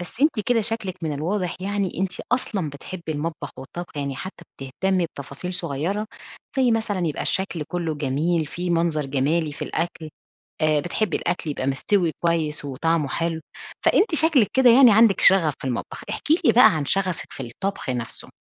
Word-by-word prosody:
بس 175 Hz, +7 st, -9 dB
أنتِ 290 Hz, -6 st, +3 dB
كده 240 Hz, -2 st, +3 dB
شكلِك 215 Hz, -4 st, -2 dB
من 155 Hz, -2 st, -1 dB
الواضح 175 Hz, +5 st, -2 dB
يعني، 200 Hz, -1 st, -2 dB
أنتِ 190 Hz, -1 st, 0 dB, 0.2 s
أصلًا 200 Hz, -, 0 dB
بتحبّي 160 Hz, +3 st, -7 dB
المطبخ 150 Hz, -1 st, -4 dB
والطّبخ 170 Hz, +5 st, -8 dB
يعني 140 Hz, -2 st, -3 dB
حتى 185 Hz, -2 st, -8 dB
بتهتمي 175 Hz, +7 st, -1 dB
بتفاصيل 140 Hz, +6 st, -7 dB
صغيرة، 180 Hz, +8 st, -2 dB, 0.5 s
زي 255 Hz, -2 st, +3 dB
مثلًا 210 Hz, -6 st, 0 dB
يبقى 150 Hz, -, -2 dB
الشكل 185 Hz, -4 st, -1 dB
كلُّه 170 Hz, -3 st, -2 dB
جميل 150 Hz, +3 st, 0 dB
فيه 175 Hz, +4 st, -4 dB
منظَر 165 Hz, -4 st, +1 dB
جمالي 145 Hz, +4 st, 0 dB
في -, -, -7 dB
الأكل، 165 Hz, -2 st, -3 dB, 0.5 s
آآ 155 Hz, -1 st, +3 dB
بتحبّي 175 Hz, +3 st, -1 dB
الأكل 175 Hz, -3 st, -2 dB
يبقى 135 Hz, -2 st, -3 dB
مِستوي 165 Hz, +5 st, +1 dB
كويّس 160 Hz, -3 st, 0 dB
وطعمُه 150 Hz, +2 st, 0 dB
حلو، 165 Hz, +3 st, -2 dB, 0.4 s
فأنتِ 385 Hz, -3 st, +3 dB
شكلِك 315 Hz, -8 st, +4 dB
كده 260 Hz, -2 st, +6 dB
يعني 245 Hz, -1 st, +8 dB
عندِك 220 Hz, -1 st, +5 dB
شغف 165 Hz, -7 st, +5 dB
في -, -, -5 dB
المطبخ، 120 Hz, -, -5 dB
احكي 320 Hz, +4 st, +1 dB
لي -, -, +6 dB
بقى 240 Hz, -8 st, +7 dB
عن 150 Hz, -, -1 dB
شغفِك 185 Hz, -3 st, -1 dB
في 135 Hz, -, -7 dB
الطبخ 135 Hz, +7 st, -4 dB
نفْسه. 120 Hz, -2 st, -5 dB
170 Hz, 170 wpm, -23 LUFS, 150-200 Hz, 0.5 s, يعني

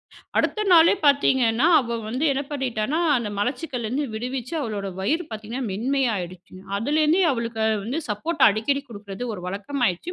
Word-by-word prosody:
அடுத்து, -, -, -19 dB
அடுத்த 425 Hz, -, +1 dB
நாளே 330 Hz, +1 st, +7 dB
பார்த்தீங்கன்னா, 265 Hz, -3 st, +3 dB
அவ 235 Hz, -2 st, -3 dB
வந்து 255 Hz, +7 st, -2 dB
என்ன 275 Hz, +1 st, -1 dB
பண்ணிட்டான்னா, 265 Hz, 0 st, -1 dB, 0.2 s
அந்த 235 Hz, -4 st, -2 dB
மலச்சிக்கல்லருந்து 250 Hz, +2 st, -2 dB
விடுவிச்சி 250 Hz, +4 st, -4 dB
அவளோட 205 Hz, -5 st, -3 dB
வயிறு 315 Hz, -, 0 dB
பார்த்தீங்கன்னா, 225 Hz, +4 st, -5 dB
மென்மையாயிடுச்சுங்க. 195 Hz, -6 st, -2 dB, 0.2 s
அதுலேருந்தே 305 Hz, -, +2 dB
அவளுக்கு 230 Hz, -3 st, -3 dB
அ -, -, +3 dB, 0.2 s
வந்து 265 Hz, +8 st, -2 dB
சப்போட்டா 285 Hz, +8 st, +1 dB
அடிக்கடி 275 Hz, +7 st, -1 dB
குடுக்குறது 205 Hz, 0 st, -7 dB
ஒரு 180 Hz, -, -8 dB
வழக்கமாயிடுச்சு. 205 Hz, -, -2 dB
245 Hz, 140 wpm, -24 LUFS, 215-280 Hz, 0.2 s, நாளே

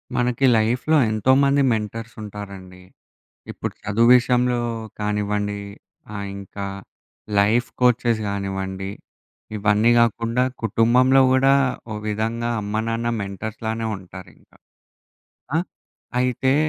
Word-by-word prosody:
మనకి 125 Hz, +1 st, +1 dB
లైఫ్‌లో 125 Hz, +8 st, +2 dB
ఎంతోమంది 135 Hz, +5 st, +3 dB
మెంటర్సుంటారండి. 105 Hz, -4 st, -7 dB, 0.7 s
ఇప్పుడు -, -, -5 dB
చదువు 110 Hz, +4 st, +2 dB
విషయంలో 125 Hz, 0 st, +1 dB, 0.4 s
కానివ్వండి, 105 Hz, 0 st, -1 dB, 0.6 s
ఆహ్, 100 Hz, 0 st, -4 dB
ఇంకా 100 Hz, 0 st, -7 dB, 0.7 s
లైఫ్ 110 Hz, +4 st, +3 dB
కోచెస్ 120 Hz, -2 st, +3 dB
గానివ్వండి, 95 Hz, -1 st, -4 dB, 0.7 s
ఇవన్నీ 105 Hz, +2 st, +3 dB
గాకుండా, 115 Hz, +1 st, +2 dB, 0.2 s
కుటుంబంలో 125 Hz, +5 st, +4 dB
గూడా 135 Hz, +1 st, +4 dB, 0.4 s
ఓ -, -, -4 dB
విధంగా 115 Hz, +3 st, -2 dB
అమ్మ, 105 Hz, +1 st, -5 dB
నాన్న 115 Hz, +1 st, -1 dB
మెంటర్స్‌లానే 110 Hz, +3 st, -4 dB
ఉంటారింక. 95 Hz, -1 st, -14 dB, 1.1 s
ఆహ్, 175 Hz, -, 0 dB, 0.5 s
అయితే, 125 Hz, +1 st, +1 dB
110 Hz, 90 wpm, -22 LUFS, 100-125 Hz, 1.1 s, కుటుంబంలో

